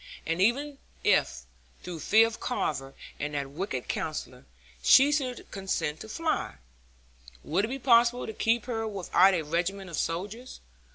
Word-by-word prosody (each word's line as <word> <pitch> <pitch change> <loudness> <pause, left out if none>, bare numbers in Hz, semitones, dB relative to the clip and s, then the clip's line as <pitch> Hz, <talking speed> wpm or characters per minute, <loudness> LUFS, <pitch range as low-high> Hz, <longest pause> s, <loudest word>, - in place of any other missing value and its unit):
And 165 +2 -1
even 275 +7 +1 0.2
if, 65 0 +2 0.4
through 175 -2 -6
fear 220 +8 +5
of 230 0 -5
Carver 135 - -3 0.2
and 150 0 -3
that 140 -1 -3
wicked 145 -6 -4
Counsellor, - - -4 0.4
she 270 - +6
should 260 -5 -2
consent 165 -6 -2
to 220 - -9
fly, 325 +7 -2 0.9
would 185 - 0
it - - -4
be 265 +3 -4
possible 245 -1 +4
to 220 - -6
keep 225 +1 +1
her 225 -3 -2
without 195 -1 +3
a 165 - -1
regiment 175 +4 -2
of - - -4
soldiers? 205 +9 -4
200 Hz, 155 wpm, -28 LUFS, 165-240 Hz, 0.9 s, she